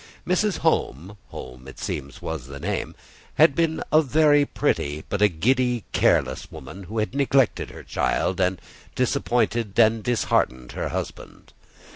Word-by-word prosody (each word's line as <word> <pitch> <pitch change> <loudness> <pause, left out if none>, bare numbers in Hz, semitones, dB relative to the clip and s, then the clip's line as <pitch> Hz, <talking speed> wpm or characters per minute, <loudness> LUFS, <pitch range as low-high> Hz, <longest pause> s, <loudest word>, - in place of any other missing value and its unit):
Mrs. 185 +3 +1
Home 90 +10 0
(Home 65 +1 -10
it 65 - -11
seems 70 +1 -5
was 75 -6 -5
the 70 0 -9
name) 95 +6 -3 0.4
had - - +6
been 160 +1 0
a 155 - +6
very 145 0 +4
pretty, 75 +2 -1
but 100 - -2
a 105 - +7
giddy, 120 +6 +1
careless - - +1
woman, 90 +9 -10
who 110 +6 -7
had 110 +2 -1
neglected 135 -3 +2
her - - -11
child, 95 - -1
and 90 0 +1 0.4
disappointed 120 -4 0
and 115 -1 +4
disheartened 65 - 0
her - - -3
husband. - - -7
110 Hz, 145 wpm, -24 LUFS, 80-130 Hz, 0.4 s, a